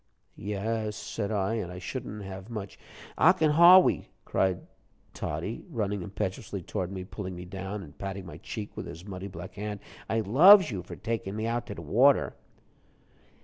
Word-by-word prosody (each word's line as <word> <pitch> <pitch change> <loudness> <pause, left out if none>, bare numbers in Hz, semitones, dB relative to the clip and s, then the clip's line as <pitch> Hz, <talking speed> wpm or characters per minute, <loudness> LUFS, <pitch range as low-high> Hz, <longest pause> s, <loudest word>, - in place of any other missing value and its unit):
"Yes," 105 +2 -3
said 105 0 -4
I, 100 0 0
"and 90 -4 -4
I 90 - -8
shouldn't 105 +1 -6
have 95 +2 -8
much 105 -4 -7 0.2
" - - -17
"Ocken 160 -3 +5
Hawwy," 175 +4 +7 0.2
cried 95 -1 +1 0.5
Toddie, 80 +9 -4
running 105 - -2
impetuously 95 0 -4
toward 95 0 -3
me, 95 -1 -5
pulling 95 -1 -6
me 90 +1 -8
down, 95 +2 -6
and 75 -3 -13
patting 95 -1 -5
my 85 -3 -9
cheek 105 +3 -7
with - - -6
his 85 +4 -9
muddy 95 -1 -6
black 95 -1 -9
hand, 105 +1 -5 0.3
"I 110 0 +1
loves 160 - +8
you 95 -4 -3
for - - -9
takin' 105 -2 -3
me 110 +1 -2
out 120 +1 -2
de 100 -6 -7
water." 120 - +3
100 Hz, 170 wpm, -28 LUFS, 95-115 Hz, 0.5 s, loves